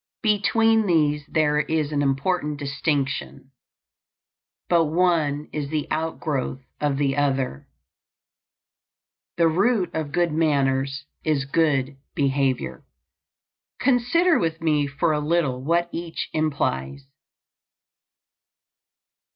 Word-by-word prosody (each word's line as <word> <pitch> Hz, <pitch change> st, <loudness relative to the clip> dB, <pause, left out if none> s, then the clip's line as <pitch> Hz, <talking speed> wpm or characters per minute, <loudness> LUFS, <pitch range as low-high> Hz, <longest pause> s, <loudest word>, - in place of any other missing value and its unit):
Between 220 Hz, +1 st, +3 dB
these 150 Hz, -4 st, +2 dB
there 150 Hz, -1 st, +2 dB
is 155 Hz, -1 st, -1 dB
an 145 Hz, -1 st, 0 dB
important 145 Hz, +2 st, 0 dB
distinction, 140 Hz, -1 st, -2 dB, 1.2 s
but 170 Hz, -2 st, +3 dB
one 155 Hz, -3 st, +1 dB
is 145 Hz, -2 st, -3 dB
the 155 Hz, -1 st, -1 dB
outgrowth 155 Hz, -4 st, -2 dB, 0.2 s
of 145 Hz, -2 st, 0 dB
the 135 Hz, -2 st, +1 dB
other. 135 Hz, -, -1 dB, 1.7 s
The 170 Hz, -1 st, +4 dB
root 195 Hz, +4 st, +1 dB
of 155 Hz, -2 st, -3 dB
good 175 Hz, +1 st, +1 dB
manners 140 Hz, -3 st, 0 dB, 0.2 s
is 150 Hz, -3 st, 0 dB
good 140 Hz, -3 st, +1 dB, 0.2 s
behavior. 135 Hz, -, 0 dB, 1.0 s
Consider 280 Hz, +8 st, +3 dB
with 165 Hz, -1 st, -1 dB
me 150 Hz, -3 st, +1 dB
for 140 Hz, +4 st, 0 dB
a 150 Hz, -, 0 dB
little 150 Hz, -4 st, 0 dB
what 170 Hz, +4 st, +1 dB
each 170 Hz, -1 st, -5 dB
implies. 70 Hz, -, -1 dB
150 Hz, 100 wpm, -24 LUFS, 140-165 Hz, 1.7 s, The